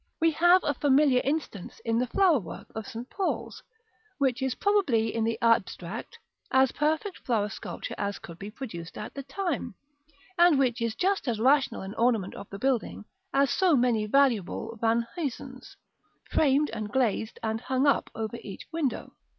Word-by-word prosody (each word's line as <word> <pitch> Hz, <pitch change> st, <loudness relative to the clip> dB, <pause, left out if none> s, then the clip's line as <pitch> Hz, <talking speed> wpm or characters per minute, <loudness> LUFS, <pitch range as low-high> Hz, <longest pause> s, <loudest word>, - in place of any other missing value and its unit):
We 330 Hz, 0 st, +4 dB
have 350 Hz, +4 st, +5 dB
a 290 Hz, -, +1 dB
familiar 275 Hz, -1 st, +4 dB
instance 280 Hz, -, -3 dB
in 230 Hz, 0 st, +1 dB
the 250 Hz, -, 0 dB
flower 350 Hz, +1 st, +4 dB
work 175 Hz, -6 st, -9 dB
of 220 Hz, -1 st, -6 dB
St. 235 Hz, +2 st, -7 dB
Paul's, 390 Hz, +4 st, -3 dB, 0.6 s
which 265 Hz, -2 st, +1 dB
is 265 Hz, -2 st, 0 dB
probably, 275 Hz, -, +2 dB
in 230 Hz, -, 0 dB
the 225 Hz, 0 st, -1 dB
abstract, 220 Hz, -3 st, 0 dB, 0.3 s
as 265 Hz, -1 st, +4 dB
perfect 315 Hz, +6 st, -1 dB
flower 215 Hz, -4 st, 0 dB
sculpture 220 Hz, -, -6 dB
as 200 Hz, -1 st, -2 dB
could 170 Hz, 0 st, -11 dB
be 200 Hz, -, -6 dB
produced 210 Hz, -8 st, -8 dB
at 210 Hz, -, -6 dB
the 280 Hz, -, -5 dB
time; 285 Hz, -, -3 dB, 0.6 s
and 345 Hz, -4 st, +6 dB
which 250 Hz, -3 st, +1 dB
is 230 Hz, -1 st, -1 dB
just 385 Hz, 0 st, 0 dB
as 230 Hz, -3 st, 0 dB
rational 270 Hz, +1 st, +3 dB
an 190 Hz, +1 st, -6 dB
ornament 225 Hz, -5 st, +1 dB
of 200 Hz, -, -9 dB
the 200 Hz, -, -7 dB
building 245 Hz, -2 st, -1 dB, 0.3 s
as 275 Hz, -3 st, +3 dB
so 360 Hz, 0 st, +3 dB
many 240 Hz, -4 st, +2 dB
valuable 230 Hz, -3 st, +1 dB
Van 230 Hz, +1 st, +2 dB
Huysums, 265 Hz, -4 st, -6 dB, 0.5 s
framed 295 Hz, 0 st, +3 dB
and 215 Hz, -2 st, -5 dB
glazed 240 Hz, -3 st, 0 dB
and 220 Hz, 0 st, -1 dB
hung 260 Hz, +2 st, 0 dB
up 285 Hz, -, +2 dB
over 225 Hz, +1 st, -4 dB
each 200 Hz, -3 st, -9 dB
window. 320 Hz, -6 st, -2 dB
250 Hz, 170 wpm, -28 LUFS, 220-285 Hz, 0.6 s, and